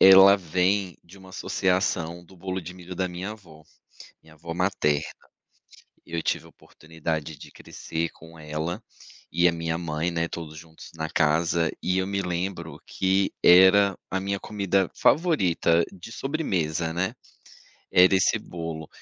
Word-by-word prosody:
ela 95 +1 +9
vem 90 0 0
de 90 +4 -16
uma 95 -1 -14
associação 90 -3 -1
do 95 - -18
bolo 95 +1 -4
de 90 +2 -8
milho 90 0 -9
da 95 +1 -1
minha 90 +4 -5
avó, 85 -8 -13 0.6
minha 80 - -18
avó 85 +2 -7
materna, 85 -5 +1 1.0
eu 85 -1 -3
tive - - -1
a - - -15
oportunidade 80 -1 -6
de - - -12
crescer 80 0 -5
com 80 0 -15
ela 80 +2 -4 0.5
e 85 +2 +4
a - - +4
minha 80 0 -2
mãe, 85 0 -2
né, 85 0 -1
todos 80 -2 -7
juntos 80 0 -13
na 80 -1 -4
casa, 80 +2 +2
e 90 +1 +1
eu 95 - 0
me 100 0 -1
lembro 90 +1 -4
que 95 +1 0
era 95 +2 +7
a 95 - -1
minha 100 +1 -2
comida 100 -3 0
favorita 90 - +3
de 95 +4 -11
sobremesa, 85 - -2
né, 90 +3 -1 0.8
era 90 +2 +6
esse 95 - +3
bolo, 80 -2 -7
90 Hz, 150 wpm, -25 LUFS, 80-95 Hz, 1.0 s, ela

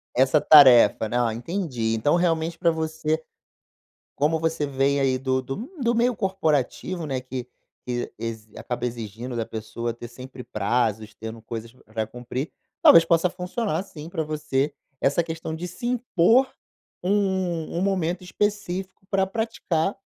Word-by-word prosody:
Essa 135 +4 +4
tarefa, 130 -7 +7
né. 120 - 0
Ah, 115 -2 +1
entendi, 125 - -2
então 145 +8 +2
realmente 165 -1 +1
para 170 -1 +3
você, 160 -1 -1 1.0
como 155 +3 +1
você 160 -2 0
vem 140 0 +1
aí, 130 -1 +2
do 130 0 0
do 135 +1 -5
m 235 +6 -7
do 235 -1 +2
meio 240 +1 +2
corporativo, 175 - -1
né, 135 -3 -2
que 130 -1 -6 0.4
que 120 -1 -3
ex 115 -1 -5
acaba 120 0 -4
exigindo 120 +1 -5
da 115 - 0
pessoa 110 +2 -4
ter 120 +1 -9
sempre 125 +2 -10
prazos, 110 0 -1
tendo 110 +1 -8
coisas 115 +1 -7
para 110 -3 -5
cumprir, 125 +5 -5 0.3
talvez 165 - +9
possa 165 +1 +3
funcionar, 180 -1 -2
sim, 155 -5 -10
para 160 -1 -2
você, 150 -2 -1 0.3
essa 145 +5 +2
questão 160 -1 -5
de 175 +2 -5
se 240 +7 -6
impor 245 0 +3 0.6
um 190 -4 0
um 175 - 0
momento 185 -2 0
específico 190 -1 -3
para 195 -1 +2
praticar, 195 -5 -1
155 Hz, 150 wpm, -24 LUFS, 120-180 Hz, 1.0 s, talvez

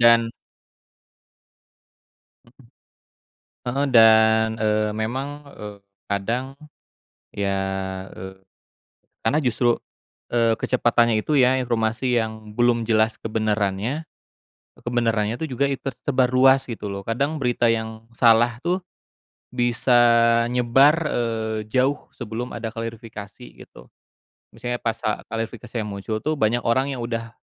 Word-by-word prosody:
dan 115 -1 +5 2.1
Mhm, 125 +2 -22 1.1
heeh, 135 +3 0
dan, 110 -1 +6
eee, 105 -1 +1
memang, 130 +6 -2 0.2
eee, 105 -1 -9 0.3
kadang 115 +6 -1 0.9
ya, 100 -1 -1 0.6
eee, 95 +1 -9 0.9
karena 115 +7 +2
justru, 120 -1 +2 0.6
eee, 115 -1 +2
kecepatannya 120 -2 +2
itu 150 +8 -1
ya 130 +1 +5
informasi 120 +1 0
yang 110 -1 -6
belum 120 -1 +2
jelas 110 0 +2
kebenarannya 110 +4 -1 0.7
kebenarannya 115 -2 -1
tuh 160 - -3
juga 140 +1 0
it 135 - -2
tersebar 135 -1 0
ruas 130 +1 +4
gitu 110 -4 -6
loh. 100 0 -6
Kadang 140 +7 -1
berita 120 -3 +1
yang 110 0 -4
salah 115 0 +3
tuh 175 +5 -1 0.7
bisa 120 0 +1 0.6
nyebar, 135 +6 +4
eee, 110 -4 -2
jauh 130 +4 0
sebelum 120 -2 -6
ada 115 0 -6
klarifikasi 115 0 -8
gitu. - - -15 0.7
Misalnya 120 0 -4
pas 115 -1 -3
a 105 - -2
klarifikasi 115 +1 -6
yang 105 - -4
muncul 105 +2 -4
tuh 155 0 -1
banyak 115 0 +1
orang 130 +4 +1
yang 125 - -5
udah 115 -1 -4
115 Hz, 115 wpm, -23 LUFS, 110-125 Hz, 2.1 s, dan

